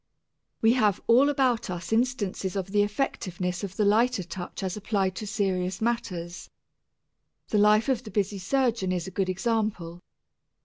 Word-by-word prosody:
We 225 +1 +6
have 210 -6 +2
all 255 +5 +5
about 260 -7 +1
us 175 +3 -4
instances 220 -6 -1
of 195 -1 -3
the 205 0 +3
effectiveness 190 -5 -2
of 195 -1 -5
the 210 - +1
lighter 225 +1 +3
touch 175 +2 -7
as 185 -1 -2
applied 200 -3 -1
to 215 - -5
serious 185 -3 -1
matters. 180 -7 -3 1.0
The 210 - +2
life 210 +1 +5
of 260 -4 +1
the 230 - -10
busy 205 -1 -1
surgeon 230 -2 0
is 180 -2 -2
a 190 - -7
good 185 0 -1
example. 190 -4 -2
205 Hz, 160 wpm, -27 LUFS, 185-230 Hz, 1.0 s, We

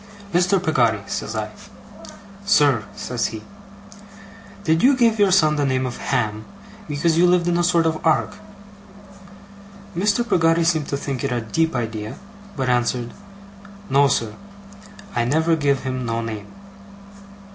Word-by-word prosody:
'Mr. 180 +3 +3
Peggotty!' 120 - +1
says 110 - -4
I. 110 0 -3 0.9
'Sir,' 145 - +3
says 125 -2 -2
he. 110 -1 -8 1.2
'Did 160 -2 +2
you 265 +1 +5
give 230 -3 +3
your 200 -1 +5
son 155 -5 +3
the 145 - +1
name 130 -1 0
of 125 - -5
Ham, 110 0 -2 0.4
because 160 +2 +1
you 180 - +5
lived 175 -1 +2
in 175 - +1
a 175 - +1
sort 170 -1 +2
of 160 -1 -1
ark?' 165 +5 +1 1.6
Mr. 210 +6 +1
Peggotty 165 -2 +3
seemed 160 -3 +1
to 140 - -2
think 140 -2 -4
it 140 - -1
a 120 - 0
deep 160 +8 -1
idea, 110 -1 -4 0.4
but 130 -2 -1
answered: 120 -1 0 0.8
'No, 140 +1 +5
sir. 115 -5 -1 0.8
I 120 - +1
never 160 +6 +2
giv 140 -3 0
him 130 -1 -3
no 115 -1 -2
name. 110 -3 -6
145 Hz, 145 wpm, -21 LUFS, 120-170 Hz, 1.6 s, you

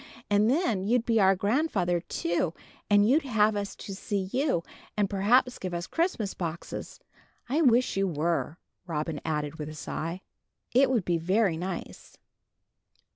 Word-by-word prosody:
And 205 +2 +4
then 255 - +1
you'd 235 +3 +1
be 225 -1 +3
our 195 -1 +5
grandfather, 200 - +1
too, 170 -1 -2 0.3
and 205 0 +5
you'd 285 +7 +4
have 220 -6 +2
us 200 -1 -3
to 200 - -7
see 195 -1 -3
you, 265 - +1 0.3
and 205 -1 +2
perhaps 230 +6 +2
give 185 -2 -4
us 170 0 -3
Christmas 325 - -1
boxes. 170 -1 -6 0.5
I 290 +6 +1
wish 250 -6 +3
you 195 0 +2
were," 165 0 -1 0.3
Robin 155 -2 -3
added 150 -1 -2
with 150 0 -4
a 155 - -8
sigh. 165 +3 -4 0.5
"It 260 +2 +5
would 235 -8 +1
be 170 -2 +1
very 190 +2 +2
nice." 175 +1 -6
195 Hz, 155 wpm, -28 LUFS, 170-235 Hz, 0.5 s, our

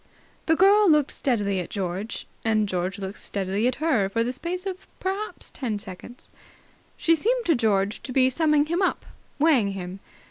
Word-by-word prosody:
The 320 - +4
girl 395 +3 +5
looked 300 -3 +4
steadily 205 -7 0
at 180 - -5
George 195 +2 -4 0.2
and 215 -2 +2
George 185 +1 -2
looked 195 0 -6
steadily 200 +3 -1
at 255 - 0
her 270 -11 +1
for 230 +3 0
the 245 +2 -2
space 355 +7 -5
of 380 -1 -6
perhaps 390 +3 -4
ten 235 -6 -3
seconds. 205 +5 -9 0.7
She 330 - +3
seemed 465 +9 +1
to 335 - +4
George 210 -5 +1
to 260 - -6
be 255 0 +4
summing 300 +2 +2
him 340 +4 -1
up, 375 - 0 0.3
weighing 270 -10 +3
him. 185 0 -6
245 Hz, 175 wpm, -25 LUFS, 200-325 Hz, 0.7 s, girl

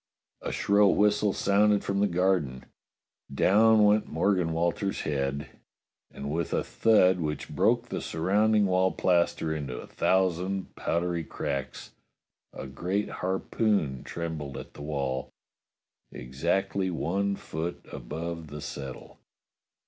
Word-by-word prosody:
A - - -4
shrill 100 0 +3
whistle 105 0 +3
sounded 100 +1 +3
from 100 0 -1
the 105 - +3
garden; 85 -8 0 0.7
down 105 +9 +5
went 105 +1 +3
Morgan 90 +1 +1
Walters's 85 +4 -1
head; 70 -1 -2 0.6
and 70 +1 -6
with 85 +1 -2
a - - 0
thud 95 -5 +3
which 75 -2 -3
broke 120 +9 +2
the - - -3
surrounding 105 +6 +2
wall 95 0 +2
plaster 85 -3 +1
into 70 -5 -5
a - - -7
thousand 95 +1 0
powdery 85 0 -1
cracks, 70 -3 -5 0.6
a - - -8
great 90 +10 -2
harpoon 95 - 0
trembled 80 -5 -5
in - - -6
the - - -11
wall, 70 -3 -3 0.8
exactly 95 +9 -1
one 100 +4 -1
foot 80 -1 -5
above 80 +5 -6
the 75 0 -8
settle. 70 -3 -8
90 Hz, 120 wpm, -28 LUFS, 75-100 Hz, 0.8 s, down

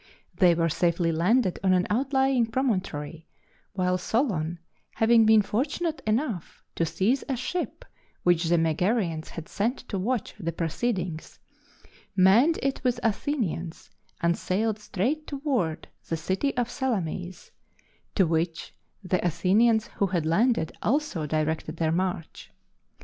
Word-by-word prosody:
They 175 -3 +5
were 165 0 +2
safely 170 +1 +1
landed 185 +5 +2
on 190 -1 +4
an 180 0 +3
outlying 265 0 +2
promontory, 185 - -2 0.5
while 185 -1 0
Solon, 180 - 0 0.4
having 225 0 +5
been 220 -1 +6
fortunate 300 - -2
enough 215 - -2
to 165 - 0
seize 230 - +1
a 265 - +1
ship 350 - -4 0.4
which 175 -1 +3
the 170 +1 +3
Megarians 165 +1 0
had 165 -1 -8
sent 230 +6 -1
to 195 - -2
watch 230 +3 -1
the 170 -4 -2
proceedings, 170 0 -3 0.8
manned 215 - +5
it 275 0 -1
with 250 -2 +1
Athenians 205 - -2 0.3
and 170 0 +2
sailed 215 +5 -1
straight 250 +10 -2
toward 265 - -2 0.2
the 165 - 0
city 190 - -1
of 245 -2 +1
Salamis, 195 - -3 0.6
to 190 - +4
which 165 +1 -1 0.3
the 185 -1 0
Athenians 200 +7 +3
who 200 - -1
had 175 -4 -1
landed 170 0 +2
also 230 - 0
directed 155 +1 -1
their 160 -1 +1
march. 175 -1 -3
190 Hz, 130 wpm, -26 LUFS, 170-240 Hz, 0.8 s, been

